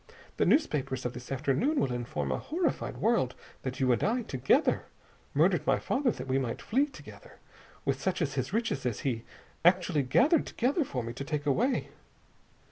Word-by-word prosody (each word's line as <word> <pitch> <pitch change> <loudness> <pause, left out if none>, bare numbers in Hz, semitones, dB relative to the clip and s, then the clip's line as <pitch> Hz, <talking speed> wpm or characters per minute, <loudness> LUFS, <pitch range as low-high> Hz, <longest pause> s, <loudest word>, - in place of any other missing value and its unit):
The - - +2
newspapers 135 - +1
of 125 - -2
this 125 +1 -9
afternoon 145 - +1
will 125 - 0
inform 120 0 -3
a - - -1
horrified 330 +1 -2
world 220 - +1 0.3
that 130 0 -4
you 130 -2 +3
and 120 - +1
I, 240 +3 +1
together, 135 - +2 0.5
murdered - - +3
my - - +4
father 265 -1 0
that 130 - -4
we 130 +1 +2
might 125 -3 -3
flee 275 +6 +1
together - - -13 0.5
with - - 0
such 190 -1 0
of 145 -5 -1
his 130 +2 -2
riches 220 - -1
as 125 -4 -2
he 135 - +1
had 115 0 -8 0.5
actually 180 -4 -1
gathered 265 - +3
together 275 +7 +1
for 130 - -4
me 115 +1 -5
to 135 - -5
take 150 0 -3
away. 230 - +1
145 Hz, 185 wpm, -30 LUFS, -, 0.5 s, my